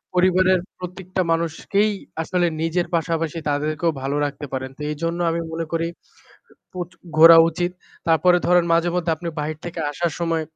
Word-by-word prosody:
পরিবারের 185 Hz, 0 st, +4 dB, 0.2 s
প্রত্যেকটা 185 Hz, +1 st, -4 dB
মানুষকেই 170 Hz, +6 st, +1 dB, 0.3 s
আসলে 175 Hz, +1 st, +1 dB
নিজের 170 Hz, +2 st, 0 dB
পাশাপাশি 165 Hz, 0 st, -1 dB
তাদেরকেও 155 Hz, +3 st, 0 dB
ভালো 135 Hz, +2 st, -2 dB
রাখতে 145 Hz, 0 st, -5 dB
পারেন। 130 Hz, 0 st, -3 dB
তো -, -, -11 dB
এইজন্য 165 Hz, +3 st, -3 dB
আমি 170 Hz, 0 st, -1 dB
মনে 165 Hz, 0 st, -3 dB
করি 165 Hz, 0 st, 0 dB, 0.9 s
প্র 185 Hz, -, -6 dB, 0.4 s
ঘোরা 165 Hz, +1 st, +10 dB
উচিত। 175 Hz, +2 st, -2 dB, 0.4 s
তারপরে 175 Hz, +3 st, +4 dB
ধরেন 175 Hz, -1 st, +4 dB
মাঝেমধ্যে 170 Hz, 0 st, +1 dB
আপনি 170 Hz, +2 st, -6 dB
বাহির 155 Hz, +1 st, -4 dB
থেকে 175 Hz, -, -5 dB
আসার 170 Hz, +2 st, -2 dB
সময় 165 Hz, -1 st, 0 dB
165 Hz, 150 wpm, -22 LUFS, 160-180 Hz, 0.9 s, ঘোরা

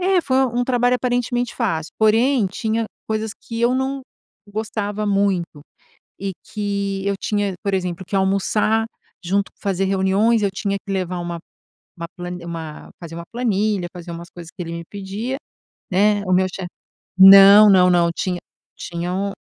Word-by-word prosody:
É, 370 Hz, 0 st, +3 dB
foi 260 Hz, -5 st, -1 dB, 0.2 s
um 245 Hz, -, +1 dB
trabalho 245 Hz, -1 st, +2 dB
aparentemente 245 Hz, -1 st, -1 dB
fácil, 165 Hz, -10 st, -2 dB
porém, 225 Hz, +2 st, +3 dB
tinha 220 Hz, +3 st, -2 dB, 0.2 s
coisas 220 Hz, 0 st, -2 dB
que 230 Hz, 0 st, -6 dB
eu 240 Hz, +2 st, +3 dB
não 270 Hz, +1 st, -1 dB, 0.5 s
gostava 210 Hz, 0 st, -3 dB
muito 195 Hz, -6 st, 0 dB, 0.6 s
e 195 Hz, 0 st, -2 dB, 0.2 s
que 200 Hz, -2 st, -2 dB
eu 200 Hz, 0 st, 0 dB
tinha 205 Hz, -2 st, -1 dB
por 200 Hz, -1 st, 0 dB
exemplo, 180 Hz, -1 st, -3 dB
que -, -, -7 dB
almoçar 200 Hz, +3 st, +1 dB, 0.4 s
junto, 195 Hz, +3 st, 0 dB
fazer 195 Hz, -1 st, -1 dB
reuniões, 195 Hz, +4 st, +2 dB
eu 200 Hz, -, +1 dB
tinha 200 Hz, 0 st, -2 dB
que 195 Hz, -, -7 dB
levar 185 Hz, -2 st, -2 dB
uma 175 Hz, 0 st, -4 dB, 0.6 s
uma 170 Hz, -, -5 dB
plani 175 Hz, -1 st, -7 dB
uma 160 Hz, -3 st, -7 dB
fazer 165 Hz, -1 st, -8 dB
uma 170 Hz, -, -6 dB
planilha, 210 Hz, -5 st, 0 dB
fazer 175 Hz, -1 st, -9 dB
umas 170 Hz, +1 st, -8 dB
coisas 170 Hz, -3 st, -11 dB
que 180 Hz, -, -7 dB
ele 165 Hz, -1 st, -5 dB
me 170 Hz, 0 st, -6 dB
pedia, 205 Hz, +6 st, -5 dB, 0.5 s
né, 205 Hz, +2 st, +3 dB
o 185 Hz, -, +1 dB
meu 185 Hz, +1 st, +3 dB
chef 185 Hz, -1 st, -6 dB, 0.5 s
Não, 195 Hz, +2 st, +10 dB
não, 180 Hz, -1 st, +5 dB
não, 170 Hz, -1 st, +3 dB
tinha 180 Hz, -2 st, -2 dB, 0.4 s
tinha 175 Hz, +1 st, -4 dB
um 200 Hz, +1 st, -2 dB
200 Hz, 165 wpm, -20 LUFS, 180-220 Hz, 0.6 s, Não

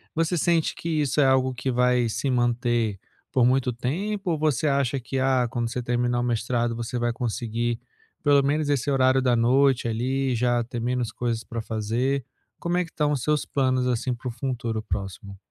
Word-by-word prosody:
Você 165 Hz, +2 st, +1 dB
sente 165 Hz, 0 st, +2 dB
que 170 Hz, -, -6 dB
isso 150 Hz, -2 st, +1 dB
é -, -, +5 dB
algo 130 Hz, -1 st, +3 dB
que 125 Hz, +2 st, -3 dB
vai 125 Hz, -1 st, +2 dB
se 135 Hz, -, -2 dB
manter 120 Hz, -4 st, +1 dB, 0.3 s
por 125 Hz, -2 st, +3 dB
muito 125 Hz, 0 st, +2 dB
tempo 180 Hz, -, -2 dB
ou 155 Hz, -, -1 dB
você 155 Hz, -2 st, +1 dB
acha 140 Hz, -1 st, +1 dB
que, 130 Hz, +2 st, -3 dB
ah, 130 Hz, -2 st, +2 dB
quando 120 Hz, -1 st, -2 dB
você 125 Hz, +1 st, -3 dB
terminar 120 Hz, 0 st, 0 dB
o -, -, -1 dB
mestrado, 120 Hz, 0 st, 0 dB
você 120 Hz, +1 st, -4 dB
vai 120 Hz, 0 st, 0 dB
conseguir, 120 Hz, -1 st, -2 dB, 0.4 s
pelo 145 Hz, -1 st, +5 dB
menos 145 Hz, +2 st, 0 dB
esse 145 Hz, -1 st, +1 dB
horário 130 Hz, -1 st, +3 dB
da 125 Hz, -2 st, +3 dB
noite 130 Hz, +2 st, +3 dB
ali, 130 Hz, +3 st, 0 dB
já 120 Hz, 0 st, +1 dB
ter 120 Hz, +1 st, -6 dB
menos 120 Hz, -1 st, -1 dB
coisas 115 Hz, -2 st, -2 dB
para 115 Hz, -1 st, -5 dB
fazer? 115 Hz, +5 st, -1 dB, 0.3 s
Como 175 Hz, +1 st, -1 dB
é 180 Hz, -, +2 dB
que 165 Hz, -, -15 dB
estão 150 Hz, -1 st, 0 dB
os 135 Hz, -4 st, -1 dB
seus 150 Hz, +1 st, +1 dB
planos 130 Hz, -2 st, +1 dB
assim 125 Hz, +1 st, 0 dB
para 120 Hz, +1 st, -7 dB
o -, -, -4 dB
futuro 120 Hz, -3 st, -3 dB
próximo? 100 Hz, -1 st, -5 dB
125 Hz, 195 wpm, -25 LUFS, 120-135 Hz, 0.4 s, é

